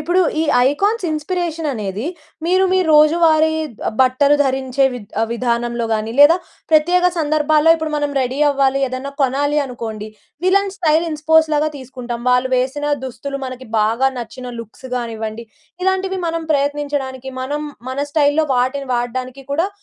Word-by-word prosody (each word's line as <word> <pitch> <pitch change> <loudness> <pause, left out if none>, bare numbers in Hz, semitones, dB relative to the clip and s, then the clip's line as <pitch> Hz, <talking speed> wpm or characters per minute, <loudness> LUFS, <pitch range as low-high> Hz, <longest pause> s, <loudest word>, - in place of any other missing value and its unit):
ఇప్పుడు, 360 +2 +1 0.2
ఈ - - +2 0.3
icons 405 +9 0
inspiration 325 0 -2
అనేది, 210 0 -4 0.4
మీరు 370 +2 +3
మీ 375 - +3
రోజువారీ 315 +1 +5 0.4
ఆబ్ 220 - -6
బట్టలు 280 +3 +3
ధరించే, 265 0 0
విధ 215 -5 -8 0.3
విధానంలో 235 0 -1
గాని, 220 +1 -2
లేదా 315 +4 +8 0.3
ప్రత్యేక 350 +4 +4
సందర్భాల్లో 310 0 +3
ఇప్పుడు, 315 -1 -4
మనం 290 -1 -1
రెడీ 255 +2 -2
అవ్వాలి, 275 -1 +2
ఏదన్నా 255 +2 -5
కొనాలి 285 +3 +1
అనుకోండి, 225 -5 -6 0.4
విలన్ 395 +1 +2
స్టైల్ 325 -3 +2
ఇన్స్ 305 0 -6
పోస్ 320 0 +6
లాగా 300 +1 +2
తీసుకుంటాం. 250 -3 -7
వాళ్ళు 250 +1 +2
వేసిన 270 +4 -1 0.2
దుస్తులు, 265 +3 -5
మనకి 255 -1 -7
బాగా 230 +5 +2
నచ్చిన 250 +1 -7
లుక్స్ 230 +4 -12
కానివ్వండి, 225 -1 -5 0.4
ఇలాంటివి 380 0 0
మనం 330 0 -2
ప్రయత్నించడానికి, 280 -2 -2
మనం 290 +3 -3 0.3
మన 265 - -5
స్టైల్‌లో 300 0 +3
వాటిని 260 +2 -1
వాడడానికి 255 +2 -4
కూడా, 335 +7 +1
280 Hz, 140 wpm, -18 LUFS, 250-315 Hz, 0.4 s, లేదా